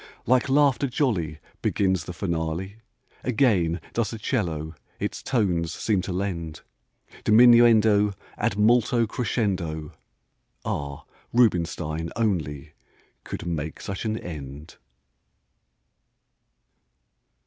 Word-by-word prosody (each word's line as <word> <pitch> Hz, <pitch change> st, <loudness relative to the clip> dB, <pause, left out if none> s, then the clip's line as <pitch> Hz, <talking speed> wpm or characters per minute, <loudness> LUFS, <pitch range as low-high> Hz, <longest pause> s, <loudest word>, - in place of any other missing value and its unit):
Like 130 Hz, +2 st, +3 dB
laughter 140 Hz, -1 st, +3 dB
jolly 105 Hz, -, -1 dB, 0.2 s
Begins 95 Hz, -3 st, +1 dB
the -, -, -6 dB
finale; 85 Hz, +2 st, -3 dB, 0.5 s
Again 105 Hz, -9 st, +2 dB
does 115 Hz, -3 st, 0 dB
the 115 Hz, -, -6 dB
'cello 80 Hz, -, -2 dB, 0.3 s
its -, -, -3 dB
tones 90 Hz, -10 st, 0 dB
seem 105 Hz, -4 st, 0 dB
to 95 Hz, -, -5 dB
lend 90 Hz, -4 st, -3 dB, 0.6 s
Diminuendo 110 Hz, -3 st, +6 dB, 0.2 s
ad 100 Hz, -, -1 dB
molto 115 Hz, +2 st, +3 dB
crescendo. 95 Hz, -10 st, -2 dB, 0.7 s
Ah! 70 Hz, -1 st, -4 dB, 0.3 s
Rubinstein 85 Hz, -8 st, +1 dB
only 85 Hz, -11 st, -2 dB, 0.5 s
could -, -, -6 dB
make 80 Hz, -2 st, -3 dB
such 100 Hz, -1 st, -5 dB
an 110 Hz, -1 st, -1 dB
end! 75 Hz, -4 st, -8 dB
95 Hz, 95 wpm, -25 LUFS, 80-115 Hz, 0.7 s, Diminuendo